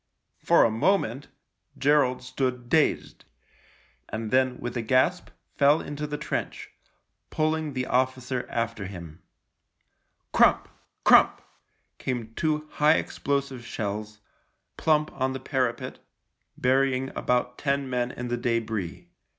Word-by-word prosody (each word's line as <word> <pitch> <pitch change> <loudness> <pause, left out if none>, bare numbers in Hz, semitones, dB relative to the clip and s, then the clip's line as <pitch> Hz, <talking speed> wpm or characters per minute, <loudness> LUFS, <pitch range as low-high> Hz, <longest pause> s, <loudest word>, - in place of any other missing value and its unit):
For - - +5
a 115 - +3
moment 135 - +1 0.5
Gerald 140 -3 +2
stood 125 -1 -3
dazed, 155 0 +1 0.9
and 110 0 -4
then 130 -1 +2
with 120 0 -5
a 120 - -1
gasp 130 +10 +1 0.3
fell 145 +2 +5
into 145 +1 -5
the 150 0 -4
trench, 150 - -4 0.6
pulling 155 -1 -1
the 130 -1 -2
officer 130 0 -1
after 115 -4 -2
him. 85 -5 -10 1.1
Crump, - - +4 0.4
crump - - +6 0.6
came 120 -4 -4
two 155 +2 -1
high 150 +2 +4
explosive 140 -5 -2
shells 105 -2 -5 0.3
— - - -47
plump 155 -1 +2
on 130 0 -1
the 135 - -4
parapet 130 -1 -2 0.3
— - - -50
burying 135 0 +1
about 125 0 0
ten 140 -1 0
men 125 -1 -1
in 125 -1 -6
the 120 0 -1
debris. 110 -7 -2
130 Hz, 125 wpm, -26 LUFS, 120-140 Hz, 1.1 s, crump